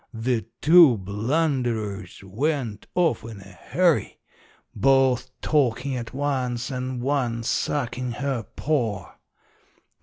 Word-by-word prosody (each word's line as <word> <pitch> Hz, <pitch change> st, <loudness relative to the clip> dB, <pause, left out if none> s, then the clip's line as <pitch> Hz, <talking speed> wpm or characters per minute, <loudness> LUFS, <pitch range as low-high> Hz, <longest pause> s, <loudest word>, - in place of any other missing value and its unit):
The 115 Hz, 0 st, -1 dB, 0.2 s
two 160 Hz, -6 st, +7 dB
blunderers 110 Hz, -, -2 dB
went 115 Hz, +1 st, -2 dB
off 170 Hz, -9 st, +2 dB
in 110 Hz, -2 st, -9 dB
a -, -, -12 dB
hurry, 160 Hz, -, 0 dB, 0.6 s
both 130 Hz, -2 st, +3 dB
talkin' 135 Hz, -2 st, +1 dB
at 120 Hz, -2 st, -5 dB
once 130 Hz, -3 st, -2 dB
and 130 Hz, -1 st, -4 dB
one 125 Hz, -4 st, 0 dB
suckin' 125 Hz, 0 st, -2 dB
her 135 Hz, -2 st, -2 dB
paw. 115 Hz, -, -1 dB
125 Hz, 100 wpm, -24 LUFS, 115-140 Hz, 0.6 s, two